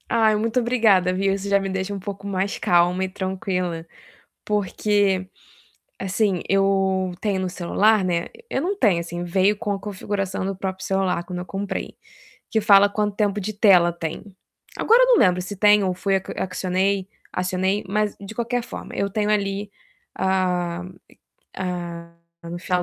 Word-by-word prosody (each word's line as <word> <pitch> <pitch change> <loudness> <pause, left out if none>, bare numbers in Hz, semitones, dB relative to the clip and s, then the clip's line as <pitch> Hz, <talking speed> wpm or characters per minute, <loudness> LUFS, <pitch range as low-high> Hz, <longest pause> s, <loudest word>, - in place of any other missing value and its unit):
Ai, 220 -2 +3
muito 225 +3 +1
obrigada, 220 -7 +3
viu, 195 +1 +1
isso 195 +1 -4
já 200 0 +4
me 195 0 -3
deixa 190 +1 -3
um 200 - -4
pouco 200 +1 -7
mais 195 0 -1
calma 175 +1 +2
e 190 - -2
tranquila, 185 -3 -3 0.6
porque, 205 -1 +1 0.7
assim, 195 -1 0
eu 195 -1 +2
tenho 200 -3 0
no 185 - -2
celular, 195 +4 +2
né, 175 -2 0 0.2
eu 265 - -1
não 375 +6 -1
tenho 200 - +3
assim 175 +1 -5
veio 190 +4 +2
com 205 - -3
a 200 - -2
configuração 195 -1 -3
do 195 0 -2
próprio 190 0 -4
celular 190 -3 0
quando 180 0 -6
eu 180 - -5
comprei, 195 +1 -5 0.5
que 220 - +1
fala 205 -1 +6
quanto 205 0 -1
tempo 205 -1 0
de 215 +3 -4
tela 190 -5 +5
tem. 165 -2 -5 0.5
Agora 465 +3 +5
eu - - +4
não - - +6
lembro 180 - +4
se 190 +3 -6
tem 210 +1 +5
ou 185 -1 0
foi 195 +1 0 0.2
acionei 190 +1 -1 0.3
acionei, 185 +2 0
mas 210 +1 0
de 200 +2 -9
qualquer 240 +1 -1
forma - - -8
eu 200 - 0
tenho 210 +1 -1
ali, 200 -1 -1 0.4
a 180 -2 0 0.8
a 175 -2 -5 0.3
como 170 +1 -7
fala 180 0 0
195 Hz, 165 wpm, -23 LUFS, 185-205 Hz, 0.8 s, fala